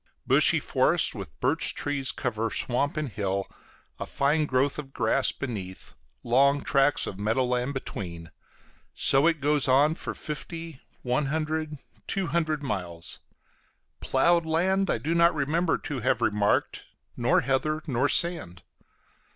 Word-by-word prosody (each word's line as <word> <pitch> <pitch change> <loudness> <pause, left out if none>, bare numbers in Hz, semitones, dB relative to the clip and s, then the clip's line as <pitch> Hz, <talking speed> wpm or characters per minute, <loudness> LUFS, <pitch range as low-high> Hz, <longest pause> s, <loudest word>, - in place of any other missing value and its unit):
Bushy - - +4
forests - - +2
with 65 -2 -9
birch - - 0
trees 145 -2 -2
cover 115 -3 -2
swamp 140 +7 -1
and 155 -1 -1
hill, 100 -4 -2 0.5
a - - -5
fine 150 +2 +1
growth 135 +2 +1
of 135 -2 -9
grass 120 +3 +1
beneath, 100 -8 -7 0.3
long 140 +4 +3
tracts 140 +1 +2
of 95 - -6
meadow 110 +5 +1
land 125 +2 -1
between; 85 -9 -6 0.6
so 135 +4 +4
it 165 -2 +1
goes 145 -1 +2
on 140 +4 +4
for - - -6
fifty, 165 0 -7 0.2
one 125 +3 0
hundred, 155 0 -2 0.3
two 195 -1 -1
hundred 155 -3 -1
miles. 90 -8 -4 0.8
Ploughed 170 +6 +2
land 185 +4 +1
I - - +1
do 160 +3 -2
not 170 0 +4
remember 160 +4 +1
to 145 -4 -5
have - - +1
remarked, 105 0 0 0.3
nor 120 +1 +2
heather, 140 +4 -1
nor 135 -1 0
sand. 165 - 0
140 Hz, 140 wpm, -26 LUFS, 120-155 Hz, 0.8 s, Bushy